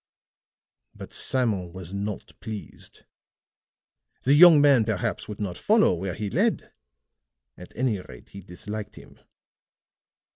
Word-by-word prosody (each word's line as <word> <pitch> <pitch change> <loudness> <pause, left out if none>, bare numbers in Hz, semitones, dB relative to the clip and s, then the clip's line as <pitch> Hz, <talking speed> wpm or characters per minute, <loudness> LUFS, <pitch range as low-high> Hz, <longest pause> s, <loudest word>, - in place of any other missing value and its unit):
But - - -11
Simon 105 -10 -1
was 95 -1 -9
not 100 0 -5
pleased; 110 -3 -9 1.2
the 135 - +3
young 165 0 +8
man 140 -5 +5
perhaps 105 -4 -3
would 105 - -8
not 95 -4 -4
follow 215 - +3
where 90 +1 -4
he 105 +1 -4
led; - - 0 0.8
at 90 - -13
any 120 -6 0
rate 60 -8 -13
he 100 - -11
disliked 105 +4 -8
him. - - -16
105 Hz, 120 wpm, -25 LUFS, 95-125 Hz, 1.2 s, young